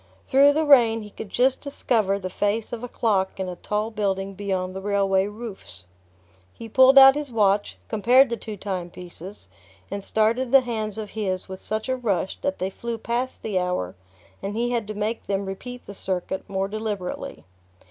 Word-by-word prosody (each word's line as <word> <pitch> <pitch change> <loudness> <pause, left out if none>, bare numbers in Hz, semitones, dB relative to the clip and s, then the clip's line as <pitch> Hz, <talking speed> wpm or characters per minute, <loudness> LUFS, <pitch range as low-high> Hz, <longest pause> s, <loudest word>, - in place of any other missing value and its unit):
Through 280 +2 +5
the 310 +1 +1
rain 230 -6 +5
he 210 - -11
could 210 - -8
just 255 +5 +2
discover 225 -8 0
the 190 -2 -5
face 205 +4 -1
of 235 0 -5
a - - -3
clock 195 -6 0
in 190 - -2
a 180 - -5
tall 210 +4 -2
building 195 -2 -1
beyond 190 -2 -3
the 190 - -5
railway 195 -1 +2
roofs. 205 - -8 0.7
He 230 - -8
pulled 260 +4 +6
out 270 0 +11
his 290 -2 -4
watch, 205 - +2
compared 245 - +4
the - - +1
two 215 -2 -7
time 185 -3 -4
pieces, 180 - -10 0.4
and 200 -1 -4
started 230 +5 +1
the 270 -1 +8
hands 220 -4 -3
of 215 -2 -6
his 190 -4 -2
with 190 -1 -7
such 215 +1 -3
a 260 - +1
rush 205 -7 -2
that 190 - -1
they 185 +1 -2
flew 235 +3 -5
past 240 +3 -3
the 205 -4 0
hour 180 - -2 0.5
and 200 +2 -4
he 240 +2 0
had 235 -4 -1
to 215 - -5
make 215 +2 -3
them 195 0 -1
repeat 245 +6 -7
the 200 - -8
circuit 190 0 -4
more 195 0 -1
deliberately. 210 -3 -5
210 Hz, 190 wpm, -24 LUFS, 195-235 Hz, 0.7 s, out